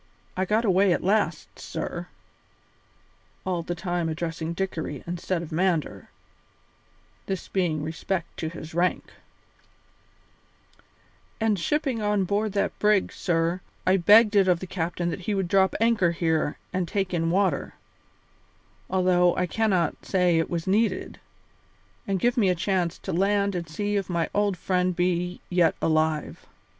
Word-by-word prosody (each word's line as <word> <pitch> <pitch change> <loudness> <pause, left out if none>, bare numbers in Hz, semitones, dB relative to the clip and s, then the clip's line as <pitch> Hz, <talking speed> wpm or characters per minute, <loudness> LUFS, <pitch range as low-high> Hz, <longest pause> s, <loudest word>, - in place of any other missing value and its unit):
I 185 - 0
got 215 +4 +1
away 190 -1 +4
at - - -2
last, 205 +3 0
sir" - - -5 1.4
(all 180 -2 -1
the 175 +1 -4
time 175 -1 -2
addressing 165 0 -3
Dickory 170 -6 -4
instead 175 0 -2
of 160 - -9
Mander, 160 - -1 1.2
this 190 -1 -3
being 165 -6 -1
respect 165 +3 -3
to 160 - -3
his 160 -1 -9
rank), 175 +2 0 2.3
"and 220 -3 +1
shipping 270 - 0
on 210 -1 +1
board 205 +2 -1
that 200 - -1
brig, 210 -2 +3
sir, 170 +1 0 0.2
I 185 +1 +4
begged 210 +4 +6
it 195 -2 +5
of 180 -2 +3
the 185 - -6
captain 175 -1 -2
that 165 - -4
he 205 - +1
would 190 -2 -1
drop 190 +1 +3
anchor 220 -7 +3
here 160 -3 0 0.2
and 185 -2 -1
take 195 0 -2
in 165 -1 0
water, 185 -4 0 1.1
although 180 -1 +3
I 180 - +1
cannot 185 -4 0
say 180 -3 +2
it 165 - -1
was 170 -2 -3
needed, 205 0 0 0.9
and 195 -1 0
give 240 +5 +1
me 205 -5 +4
a 180 - +2
chance 185 -2 -1
to - - -5
land 200 +2 +2
and 170 -2 -4
see 205 +5 -1
if 195 -2 -3
my 170 -2 -1
old 205 -2 +1
friend 180 0 0
be 180 0 -1
yet 175 -2 +3
alive. 155 -1 0
180 Hz, 150 wpm, -26 LUFS, 170-200 Hz, 2.3 s, begged